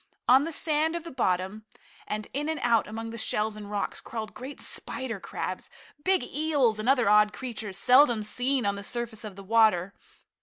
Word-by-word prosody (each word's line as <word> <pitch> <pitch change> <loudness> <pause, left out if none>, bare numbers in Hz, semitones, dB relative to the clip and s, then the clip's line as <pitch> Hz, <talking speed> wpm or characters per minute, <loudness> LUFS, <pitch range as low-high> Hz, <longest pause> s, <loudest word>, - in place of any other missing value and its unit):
On 265 +3 +6
the 330 - -4
sand 315 +1 +1
of 340 - -4
the 335 - -8
bottom, 190 -3 -1 0.4
and 210 0 -4
in 295 +3 -2
and 320 - -2
out 230 -3 +3
among 225 +1 -6
the 230 - -6
shells 215 0 0
and 210 -1 -9
rocks, 205 -1 -2
crawled 220 -2 -6
great 265 +3 -8
spider 250 -6 -3
crabs, - - -5 0.3
big 380 -1 +2
eels 285 -8 +1
and 215 +4 -1
other 255 -5 +4
odd 210 0 +5
creatures 220 -6 -6
seldom 250 -4 +5
seen 250 +3 0
on 200 - +2
the 200 - -7
surface 235 -1 -4
of 210 -3 -8
the 195 - -10
water. 205 -3 +3
230 Hz, 190 wpm, -27 LUFS, 210-265 Hz, 0.4 s, On